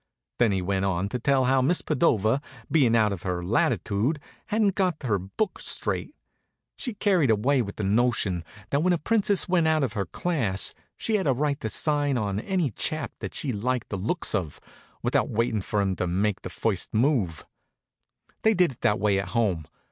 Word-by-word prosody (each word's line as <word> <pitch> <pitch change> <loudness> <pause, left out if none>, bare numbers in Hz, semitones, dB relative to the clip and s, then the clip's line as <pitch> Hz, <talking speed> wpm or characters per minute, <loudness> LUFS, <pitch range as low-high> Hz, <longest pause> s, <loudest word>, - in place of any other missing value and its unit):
Then 120 -3 +4
he 95 -2 0
went 95 +1 0
on 95 0 0
to 125 - -3
tell 135 +1 +2
how 130 +1 +3
Miss 165 +7 +2
Padova, 115 - +2 0.3
being 135 -7 +4
out 110 -3 +3
of 90 - -6
her 90 -2 -3
latitude, 115 - +1 0.3
hadn't 210 -2 +2
got 180 -6 0
her 105 -6 +1
book 100 - -3
straight. - - -1 0.6
She'd 245 -6 -5
carried 185 - +3
away 125 +6 +3
the 105 -1 -5
notion 100 -4 +1 0.3
that 140 - +2
when 180 +2 +3
a - - +2
Princess 205 +2 +2
went 175 -3 +2
out 155 -2 +2
of 125 -6 -1
her 100 -5 -2
class 115 - -1 0.2
she 220 -1 0
had 190 -6 -1
a 135 - +4
right 140 +2 -1
to 110 - -3
sign 145 0 +1
on 100 -3 -1
any 175 - -1
chap 155 +8 -2
that - - -6
she 135 -4 -1
liked 120 +3 -2
the - - -3
looks 115 - -1
of, 90 -9 -2 0.4
without - - +1
waitin' 115 -1 0
for 105 +2 -1
him 95 -1 0
to 90 - -1
make 95 +3 0
the - - -6
first 105 -2 -1
move. 110 - +1 1.0
They 220 0 +3
did 180 -4 +3
it 125 - -16
that 105 - +2
way 100 -2 +2
at 95 - -3
home. 90 -9 0
120 Hz, 195 wpm, -26 LUFS, 100-155 Hz, 1.0 s, Then